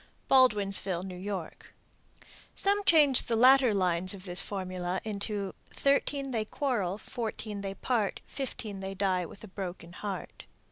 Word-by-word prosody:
Baldwinsville, 200 -8 +3
N.Y. 185 -1 -4 1.0
Some 405 +1 +3
change 295 -7 +5
the 230 - +1
latter 255 +1 +6
lines 185 -1 +2
of 185 -1 -11
this 180 -1 +2
formula 185 -2 -3
into 200 -2 -3 0.2
Thirteen 275 0 +1
they 225 -3 0
quarrel, 215 -7 -1
Fourteen 220 -3 -5
they 195 -1 -4
part, 220 -2 -1
Fifteen 245 -7 -5
they 195 0 -5
die 185 -3 0
with 200 - -13
a - - -8
broken 180 -3 -7
heart. 200 0 -6
200 Hz, 135 wpm, -30 LUFS, 185-245 Hz, 1.0 s, latter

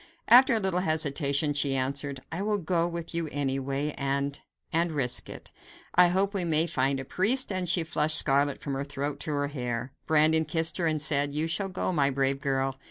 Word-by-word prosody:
After 255 +1 +7
a - - +1
little 190 -3 -1
hesitation 150 -3 +1
she 140 -1 +1
answered: 135 +1 -2
"I 165 +4 -4
will 210 +1 0
go 170 -2 -1
with 170 -1 -6
you 170 -1 -2
anyway 140 +1 -2
and 140 0 -2 0.3
and 165 0 0
risk 130 -4 -1
it. - - -10 0.4
I 180 0 +6
hope 195 +3 0
we 195 -3 0
may 160 -1 +3
find 135 -4 -1
a 135 - -6
priest," 210 - +2
and 185 -2 -2
she 175 -1 +2
flushed 155 -1 +2
scarlet 140 0 +2
from 140 - -5
her 135 +1 -3
throat 140 0 -5
to 155 - -4
her 145 0 -1
hair. 125 -2 -5
Brandon 160 +1 +3
kissed 165 +1 -1
her 170 -3 0
and 155 -1 0
said: 145 -1 +1
"You 155 +2 0
shall 195 +4 -1
go, 185 0 -2
my 140 -4 +2
brave 135 0 -1
girl. 135 -1 -2
150 Hz, 205 wpm, -27 LUFS, 140-170 Hz, 0.4 s, After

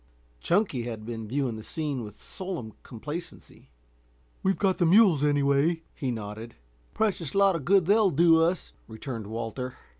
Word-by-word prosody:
Chunky 175 - +1
had 110 -3 -6
been 115 -1 -6
viewing 130 -1 -1
the - - -7
scene 145 -1 -4
with 105 -1 -11
solemn 175 - -6
complacency. 150 +8 -9 0.7
"We've 190 0 +1
got 190 -2 +1
the 175 - +3
mules, 180 -5 +5
anyway," 145 +3 +2
he 135 -4 -3
nodded. 110 0 -6 0.4
"Precious 195 -8 -1
lot 195 -2 +4
of 150 -5 -5
good 190 +1 +4
they'll 205 +2 +4
do 165 +1 +5
us," 170 +2 0
returned 110 -1 -6
Walter. 115 +3 -5
145 Hz, 150 wpm, -27 LUFS, 115-180 Hz, 0.7 s, mules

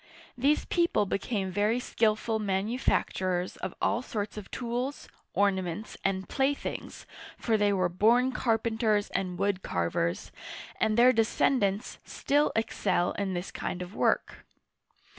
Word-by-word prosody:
These 280 +4 +2
people 340 - +2
became 195 -1 -2
very 210 +5 +1
skillful 220 -2 0
manufacturers 190 -3 0
of - - -5
all 230 - +1
sorts 210 -4 -4
of 210 -2 -8
tools, 250 +3 -3 0.3
ornaments, 190 0 0
and 190 -1 -1
playthings, 280 +1 -2 0.3
for 225 - +1
they 205 -1 +3
were 185 -2 +2
born 230 +8 +3
carpenters 225 -3 +1
and 180 -2 -2
wood 195 0 0
carvers, 85 0 -1 0.5
and 220 0 +2
their 250 +2 +7
descendants 220 -2 +1
still 290 +1 +1
excel 195 -5 +1
in 195 -2 -2
this 175 +2 -4
kind 180 - -4
of 180 +2 -10
work. - - 0
210 Hz, 125 wpm, -29 LUFS, 190-235 Hz, 0.5 s, their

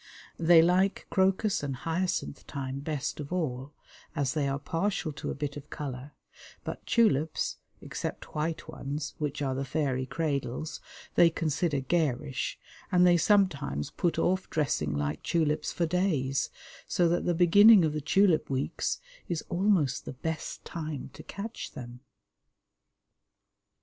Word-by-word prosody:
They 165 0 +7
like 185 +3 +2
crocus 190 +2 +2
and 140 -2 -3
hyacinth 165 +1 -2
time 135 -2 -4
best 145 0 -3
of 145 +1 -6
all, 140 -6 -2 0.4
as 135 -3 0
they 150 -3 0
are 135 0 0
partial 165 +2 -1
to - - -5
a - - -3
bit 145 0 -3
of 145 0 -10
colour, 140 -1 -6 0.5
but - - -6
tulips 160 - +2 0.2
(except - - -6
white 160 +2 -2
ones, 145 +2 -5
which 145 -1 -2
are 135 -1 0
the 135 +1 -2
fairy 135 -2 -1
cradles) 150 -2 -2 0.3
they 170 - +6
consider 155 -2 0
garish, 140 -3 -1 0.3
and 180 -1 +5
they 175 -1 +6
sometimes 165 - +2
put 175 - 0
off 185 +1 +1
dressing 75 - 0
like 75 +1 -2
tulips 155 -3 0
for 170 - 0
days, 155 -7 0 0.4
so 175 - +2
that 175 +1 +1
the 175 - +2
beginning 195 +3 +7
of 155 - 0
the 150 - -2
tulip 165 +1 +3
weeks 135 0 -1 0.3
is 170 -3 -2
almost 175 - +2
the - - -5
best 160 +5 -5
time 155 -5 -5
to - - -10
catch 220 +3 -7
them. 125 -1 -8
155 Hz, 145 wpm, -29 LUFS, 135-175 Hz, 0.5 s, They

